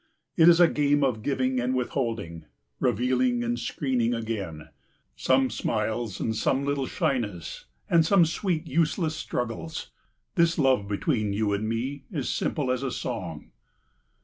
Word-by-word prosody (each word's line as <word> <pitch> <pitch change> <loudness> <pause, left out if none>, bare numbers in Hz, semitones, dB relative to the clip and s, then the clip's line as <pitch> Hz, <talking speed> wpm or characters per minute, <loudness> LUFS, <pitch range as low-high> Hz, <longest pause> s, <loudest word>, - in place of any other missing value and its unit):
It 165 0 +7
is 170 0 +6
a 175 - +8
game 145 -2 +2
of 125 -5 0
giving 130 0 0
and 125 +1 0
withholding, 115 - -2 0.3
revealing 125 +1 +1
and 120 0 -1
screening 120 -2 0
again; 100 -9 -5 0.5
some 130 -1 +2
smiles 110 -1 -2
and 110 - -1
some 135 +5 +1
little 140 -2 -1
shyness, 105 - -2 0.2
and 170 -1 +5
some 175 +1 +5
sweet 170 0 -1
useless 160 +1 0
struggles. 100 - -4 0.4
This 170 -1 +3
love 130 -9 +3
between 105 0 0
you 105 0 0
and 110 +2 -1
me 130 +5 -3
is 145 -8 -2
simple 140 -5 -1
as 130 0 -1
a 135 - -1
song. - - -5
125 Hz, 145 wpm, -26 LUFS, 110-145 Hz, 0.5 s, a